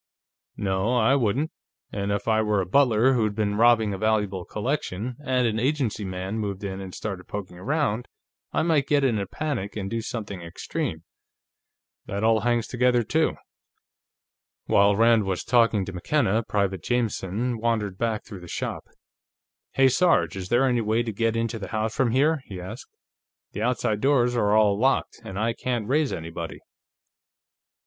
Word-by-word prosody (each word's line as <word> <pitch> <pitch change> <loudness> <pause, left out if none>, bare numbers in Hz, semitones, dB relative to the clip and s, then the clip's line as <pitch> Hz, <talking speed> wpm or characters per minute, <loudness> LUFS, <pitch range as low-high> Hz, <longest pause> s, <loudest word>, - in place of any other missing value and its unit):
"No, 100 +4 0
I 120 +3 +4
wouldn't. 135 +4 +1 0.4
And 100 0 -2
if 100 +2 -2
I 110 -1 +3
were 105 -2 +1
a 95 - 0
butler 125 +3 +4
who'd 110 -4 +1
been 105 -1 0
robbing 110 -1 +4
a 95 - -5
valuable 105 -4 0
collection, 120 -1 -3
and 130 -3 +1
an 110 -1 0
agency 130 -4 0
man 95 +3 -4
moved 100 -2 -4
in 95 -1 -4
and 95 -1 -8
started 95 -4 -5
poking 95 -3 -6
around, 125 - -1 0.4
I - - +1
might 155 -4 +2
get 145 -1 +3
in 120 -6 +2
a 100 - -3
panic 125 -5 -3
and 100 -2 -4
do 115 0 -1
something 110 -5 -5
extreme. 115 - -4 1.0
That 100 0 -3
all 110 0 +4
hangs 120 0 +1
together, 125 -1 +2
too." - - +1 1.3
While 100 0 +4
Rand 115 0 +4
was 95 -2 -2
talking 115 -4 +3
to 95 - -7
McKenna, 110 - +1
Private 100 -5 -1
Jameson 115 0 -1
wandered 110 -4 -1
back 115 -2 -1
through 100 - -9
the 90 - -11
shop. - - -4 0.9
"Hey, 135 0 +5
Sarge, 170 - +3
is 95 -1 -6
there 120 +3 +3
any 120 -2 +2
way 110 +2 +1
into 115 +1 -1
the 95 - -6
house 110 +2 -2
from 130 -3 +2
here?" 145 +5 +2
he 95 -2 -8
asked. 90 +1 -8 0.6
"The - - -5
outside 110 -3 0
doors 125 -3 +3
are 105 -3 +2
all 105 -2 +3
locked, 130 -1 +1
and 100 -4 -7
I 115 +2 0
can't 120 -3 -3
raise 145 +2 +2
anybody." 85 0 -5
110 Hz, 165 wpm, -25 LUFS, 100-125 Hz, 1.3 s, Hey